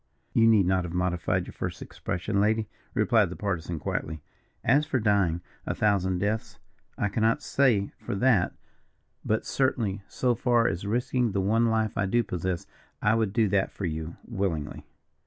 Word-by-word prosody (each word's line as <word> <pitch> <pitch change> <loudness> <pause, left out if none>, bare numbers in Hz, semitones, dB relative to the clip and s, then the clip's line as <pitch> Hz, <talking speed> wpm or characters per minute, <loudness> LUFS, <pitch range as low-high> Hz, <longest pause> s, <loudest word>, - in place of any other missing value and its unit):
"You 115 0 +5
need 110 -4 +5
not 95 0 +2
have 85 0 -5
modified 90 -1 0
your - - -10
first - - -4
expression, 100 +3 -2
lady," 110 +1 +2 0.3
replied 110 -6 +3
the 90 - -6
Partisan, 90 -4 -3
quietly; 75 0 -4 0.4
"as 145 +5 +4
for 140 -4 -1
dying 100 -6 +2 0.3
a - - -1
thousand 95 -3 +2
deaths, 105 +4 -2 0.4
I 105 - +1
cannot 115 +7 +1
say 120 -8 +2
for - - -4
that, 115 -4 +3 0.7
but 110 +1 0
certainly 110 -7 0
so 125 -1 +1
far 120 0 +2
as 90 +5 -2
risking 125 0 0
the 100 - +1
one 115 +4 +2
life 110 -1 0
I 100 - +1
do 120 +5 +2
possess, 90 -1 -3 0.3
I 105 - +3
would 110 -3 +1
do 110 0 +2
that 100 -1 +2
for 100 - -5
you, 80 0 -4
willingly." 95 -9 -3
100 Hz, 170 wpm, -27 LUFS, 90-115 Hz, 0.7 s, You